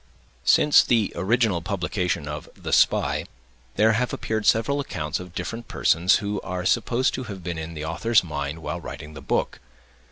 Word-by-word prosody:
Since 150 - +6
the 115 -4 +1
original 100 0 +1
publication 90 -4 -2
of 75 +1 -6
The - - -5
Spy, - - +3 0.5
there 110 +1 +4
have 120 +2 0
appeared 110 -1 -2
several 130 +6 +3
accounts 75 - -3
of 90 -1 -10
different 115 +6 -5
persons 90 +4 +3
who 100 -1 -2
are 90 -1 -4
supposed 120 +6 +2
to 130 - -4
have 100 -5 -8
been 85 -2 -4
in 80 +1 -6
the 75 0 -5
author's 105 +7 +2
mind 75 -1 -4
while 75 +4 -4
writing 75 -1 -8
the 75 - -9
book. - - -1
90 Hz, 170 wpm, -24 LUFS, 80-110 Hz, 0.5 s, Since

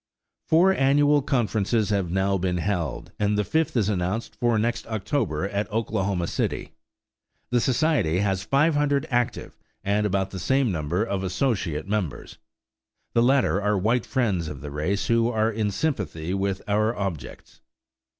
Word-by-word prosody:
Four 180 +4 +5
annual 145 -1 +3
conferences 110 -4 0
have 100 -4 0
now 95 +2 +1
been 90 0 0
held, 85 -5 -2
and 105 0 +1
the 105 - +2
fifth 160 +2 0
is 105 -4 +2
announced 95 +2 -2
for 120 -2 +2
next 120 +2 -1
October 105 - -1
at 100 +2 -3
Oklahoma 100 -5 -1
City. - - -3 0.8
The 120 -1 +3
society 130 - +2
has 95 -1 0
500 145 +3 +2
active 120 0 -1 0.2
and 105 +1 +1
about 95 -1 -1
the 95 - -5
same 135 +2 +1
number 85 +4 -1
of 100 -4 -2
associate 95 - -1
members; 95 -11 -3 0.7
the 115 - +3
latter 130 -5 +3
are 105 0 +1
white 110 +5 +1
friends 100 - 0
of 75 -2 -7
the 75 -1 -7
race 85 +8 -1
who 115 0 +2
are 110 -1 +1
in 110 -1 -1
sympathy 100 - -2
with 95 -1 -1
our 110 +3 +1
objects. 95 -9 -6
105 Hz, 150 wpm, -25 LUFS, 95-120 Hz, 0.8 s, Four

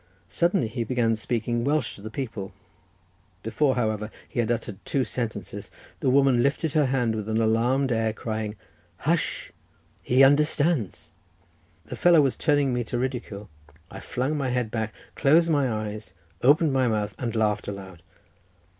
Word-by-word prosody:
Suddenly 170 - +1
he 115 +2 -3
began 115 -1 +1
speaking 115 +1 -2
Welsh 150 +4 0
to - - -13
the 110 - -7
people; 110 -6 -5 0.9
before, 145 -3 +1
however, 110 -3 -1 0.2
he - - -5
had 115 -2 +1
uttered 115 -4 -4
two 135 - 0
sentences, 105 -4 -5 0.3
the 130 - +1
woman 135 -2 +4
lifted 140 +3 0
her 150 -3 +3
hands 125 -4 0
with 110 0 -4
an 110 0 +1
alarmed 120 +4 +2
air, 115 -1 +1
crying 110 -1 -4 0.4
"Hush! - - -1 0.5
he 130 +2 +4
understands." 145 - +2 0.7
The - - -7
fellow 175 -2 +5
was 135 -3 +1
turning 145 -4 +2
me 120 0 0
to 120 - -3
ridicule. 120 -5 -4 0.4
I 95 - -8
flung 130 +8 -2
my 140 -3 -1
head 125 -3 -1
back, 110 -1 -2 0.2
closed 160 +4 +4
my 140 -5 +2
eyes, 110 -3 -5 0.3
opened 145 +3 +4
my 130 -1 +2
mouth, 105 -2 -1
and 120 -3 -3
laughed 105 -2 0
aloud. 95 -4 -8
120 Hz, 155 wpm, -25 LUFS, 110-135 Hz, 0.9 s, fellow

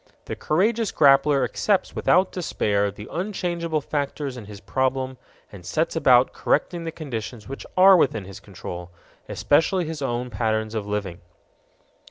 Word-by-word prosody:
The - - -5
courageous 215 +7 +1
grappler 140 -1 +4
accepts 200 -3 0
without 185 +1 +3
despair 105 - 0
the 105 +1 -10
unchangeable 175 -4 -2
factors 140 -1 -3
in 120 -4 -9
his 100 -1 -10
problem 130 +1 -2 0.3
and 100 -3 -11
sets 155 - -1
about 130 -5 +4
correcting 170 +3 -1
the 165 - -3
conditions 120 -8 -6
which 135 +1 -8
are 190 +1 +8
within 120 - +1
his 95 -1 -10
control 90 -2 -8 0.4
especially 175 +4 +2
his 155 -1 -6
own 125 -1 -2
patterns 110 0 -1
of 105 -2 -3
living. 100 -3 -4
135 Hz, 145 wpm, -24 LUFS, 110-165 Hz, 0.4 s, are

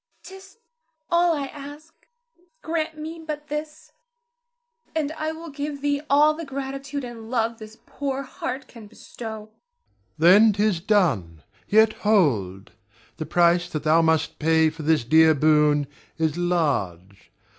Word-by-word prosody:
Zara. 380 - -11
'T - - -9
is 390 +3 -19 0.5
all 340 -1 +3
I 280 - -3
ask; 290 +3 -11 0.7
grant 320 -1 -3
me 320 +2 -7
but 300 -1 -6
this, 300 +1 -6 1.0
and 305 -2 -1
I 315 0 -3
will 325 0 -9
give 285 0 -5
thee 285 0 0
all 295 +2 +5
the 330 +2 -7
gratitude 275 0 -5
and 230 -2 -9
love 230 -1 -1
this 215 0 -12
poor 275 -1 -4
heart 260 0 -6
can 225 -3 -13
bestow. 220 0 -9 0.7
Ber. 160 - 0
Then 210 +5 +7
'tis 205 -3 +1
done. 130 - 0 0.2
Yet 220 +1 +4
hold! 115 - +1 0.5
the 155 - -5
price 175 +1 +2
that 155 -3 -4
thou 160 +2 +4
must 160 -1 0
pay 160 0 +3
for 160 +1 -10
this 155 -3 +2
dear 160 +5 +5
boon 150 0 +3 0.3
is 160 -2 0
large. 130 - -2
220 Hz, 145 wpm, -23 LUFS, -, 1.0 s, Then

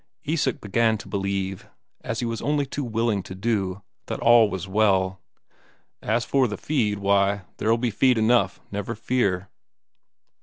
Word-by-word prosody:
Isak 145 -4 0
began 110 +2 +1
to - - -11
believe, 95 -1 -3 0.3
as 115 - -3
he - - -1
was 115 -1 -3
only 145 0 0
too 140 +2 -4
willing 115 -3 0
to 95 - -9
do, 100 -2 -1 0.2
that - - -4
all 115 -2 +6
was 95 -1 -5
well. 95 -2 +2 0.8
"As 115 +3 0
for 135 -2 +2
the 105 - -5
feed, 115 -9 0
why, 100 0 +2
there'll 115 +2 +2
be 120 0 -1
feed 125 +3 +3
enough, 110 -4 +2
never 100 0 -4
fear." 100 -5 0
110 Hz, 155 wpm, -24 LUFS, 100-120 Hz, 0.8 s, all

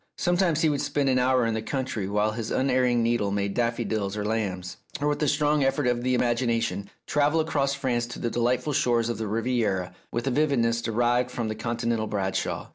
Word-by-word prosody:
Sometimes 175 -3 +2
he 160 - +4
would 145 -1 0
spend 140 -2 0
an 130 -1 +3
hour 125 -1 +3
in 115 - 0
the 110 - -2
country, 120 -5 -3
while 105 +1 +1
his 110 0 -4
unerring 125 -2 +2
needle 115 -3 +1
made 100 0 -1
daffo 120 0 0
dils 100 -2 -2
and 105 - -2
lambs; 95 -5 -2 0.2
or, 145 - 0
with 150 +1 0
a 150 - +2
strong 150 0 +2
effort 135 +1 +1
of 120 -1 +1
the 125 +1 +1
imagination, 120 -4 0 0.2
travel 150 +2 +2
across 140 -3 0
France 125 -4 -1
to 120 - -8
the 120 - -2
delightful 125 +5 0
shores 120 -3 +2
of 120 - -3
the 110 - -2
Riviera 110 -4 -1 0.2
with 120 +2 -2
a 135 - +1
vividness 120 -5 +2
derived 120 +2 +1
from 120 -3 -3
the 110 - -3
Continental 115 0 -1
Bradshaw. 95 -2 -2
120 Hz, 205 wpm, -26 LUFS, 110-135 Hz, 0.2 s, he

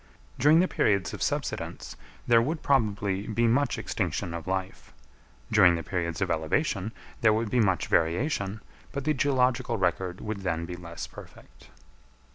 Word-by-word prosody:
During 155 +5 +6
the 185 - +2
periods 100 - +1
of - - -7
subsidence, - - -3 0.3
there 115 -1 +5
would 155 +6 -2
probably 105 -6 +1
be 115 +2 +1
much 135 +5 +2
extinction 85 - -2
of 85 -1 -6
life; 95 0 -4 0.6
during 95 -5 +6
the 85 - -4
periods 85 -1 -3
of 95 -2 +1
elevation, 95 - 0 0.3
there 110 -2 +5
would 110 0 -1
be 125 - +2
much 95 -5 +2
variation, 100 - 0 0.3
but 140 -1 -4
the 155 +2 +2
geological 130 -3 +1
record 90 -1 -1
would 110 -1 -4
then 85 -3 -2
be 90 +1 -6
less 85 -1 -7
perfect. - - -14
105 Hz, 155 wpm, -27 LUFS, 90-125 Hz, 0.6 s, During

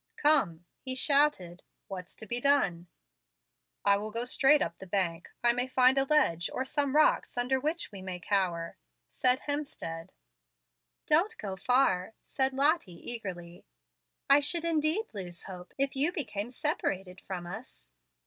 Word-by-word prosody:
"Come," 210 - +3
he 260 -1 -5
shouted, 270 - +3 0.3
"what's 185 -2 -7
to 220 - -7
be 240 +3 0
done?" 195 -12 +2 1.0
"I 200 0 +5
will 210 +2 -5
go 230 +3 -3
straight 270 +3 +5
up - - -6
the 190 - -10
bank. 175 -3 -1
I 240 - +5
may 245 +1 -2
find 255 0 +4
a 270 - +2
ledge, 265 - +2
or 260 - -3
some 285 0 0
rocks, 305 -4 +3
under 250 +2 +1
which 310 +3 -3
we 195 -2 -9
may 185 -1 -6
cower," 175 -3 -1 0.3
said 255 +1 +2
Hemstead. 190 - -4 1.0
"Don't 355 +9 +2
go 195 -2 -5
far," 195 -3 +1
said 265 -1 0
Lottie, 270 - 0
eagerly. 180 -5 -6 0.6
"I 280 +1 +7
should, 330 +4 +2
indeed, 325 +6 0
lose 180 -4 -6
hope, 180 -2 -10
if 275 0 -1
you 290 +6 +1
became 235 - -4
separated 195 -9 -3
from 180 -2 -6
us." 195 - -9
240 Hz, 150 wpm, -29 LUFS, 185-285 Hz, 1.0 s, I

